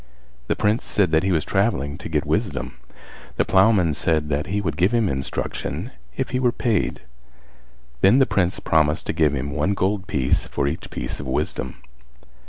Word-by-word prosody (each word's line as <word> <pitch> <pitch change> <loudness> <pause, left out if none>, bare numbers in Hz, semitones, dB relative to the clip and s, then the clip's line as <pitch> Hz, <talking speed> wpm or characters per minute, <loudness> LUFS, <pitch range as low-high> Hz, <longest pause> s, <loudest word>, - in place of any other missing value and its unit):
The - - +1
Prince 105 +3 +1
said 95 -5 +1
that 80 0 +4
he 95 - 0
was 80 -4 +1
travelling 95 -9 0
to - - -7
get 75 -2 0
wisdom. - - -2 0.6
The - - +2
ploughman 95 -4 +4
said 80 -1 0
that 75 +1 -1
he 100 +5 -1
would 80 -7 -2
give 90 +8 +2
him 115 -3 +2
instruction 70 - -3 0.3
if 135 - -1
he 125 - 0
were 125 -2 +3
paid. 115 -5 0 1.0
Then 100 +6 +6
the 135 - +5
Prince 90 -5 0
promised 80 -1 +1
to - - -2
give 80 -3 +2
him 70 +1 -3
one 75 +8 0
gold 95 +1 -1
piece 65 -2 0
for 70 -1 -1
each 80 +5 -4
piece - - -5
of 70 - -6
wisdom. 65 -1 -3
85 Hz, 185 wpm, -23 LUFS, 75-100 Hz, 1.0 s, Then